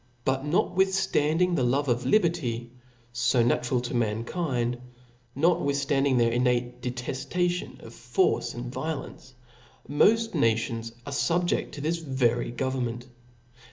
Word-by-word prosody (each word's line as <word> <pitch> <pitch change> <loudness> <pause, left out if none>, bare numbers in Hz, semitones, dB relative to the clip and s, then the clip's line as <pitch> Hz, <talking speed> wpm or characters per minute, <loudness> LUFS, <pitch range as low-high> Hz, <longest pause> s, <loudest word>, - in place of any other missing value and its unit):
But 135 0 +1
notwithftariding 180 0 +2
the 130 - +1
Jove 135 +4 +1
of 120 -1 0
liberty, 155 - +1 0.2
\ 120 -1 -33
fo 120 0 +2
natural 125 +1 +1
to 120 - -5
mankind,, 120 +2 -1 0.6
notwithftanding 140 -4 +2
their 115 -1 +3
in* 120 +2 +1
j 125 -1 +4
nate 120 0 -5
deteftation 135 +9 -2
of - - -11
force 120 - 0
and 120 +1 -6
violence, 135 -4 -6 0.5
moft 225 +10 +3
nations 115 0 0
| 120 - -28
are 140 - -5
fubjcA 175 +4 +1
to 145 - -7
tbisvery 130 -7 0
government. 125 -1 -2
130 Hz, 125 wpm, -27 LUFS, 120-160 Hz, 0.6 s, j